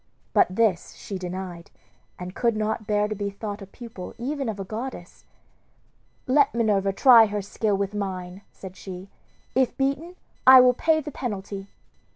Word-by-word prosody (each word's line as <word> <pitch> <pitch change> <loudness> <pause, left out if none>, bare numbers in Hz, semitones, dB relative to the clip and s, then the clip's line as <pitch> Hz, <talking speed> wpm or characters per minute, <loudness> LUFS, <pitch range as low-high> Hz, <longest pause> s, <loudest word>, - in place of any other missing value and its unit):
But - - +5
this 210 -6 +1
she 195 -2 -7
denied, 180 -1 -6 0.5
and 180 0 -7
could 235 0 +1
not 215 0 -2
bear 210 0 +1
to 215 - -3
be 205 -1 -3
thought 205 +1 -6
a 195 - -9
pupil 220 -3 -10
even 270 +1 -3
of 210 -2 -5
a - - -3
goddess. 215 -2 -7 1.0
"Let 275 -1 +3
Minerva 205 -4 +2
try 230 +2 +7
her 205 -1 -3
skill 205 +1 -1
with 200 0 -2
mine," 190 -2 -5
said 190 -1 -11
she; 190 0 -9 0.4
"if 260 -2 +1
beaten 280 +6 -1 0.3
I 260 0 +11
will 250 0 +6
pay 315 +5 +2
the 300 0 -7
penalty." 200 -5 -5
210 Hz, 165 wpm, -25 LUFS, 195-245 Hz, 1.0 s, I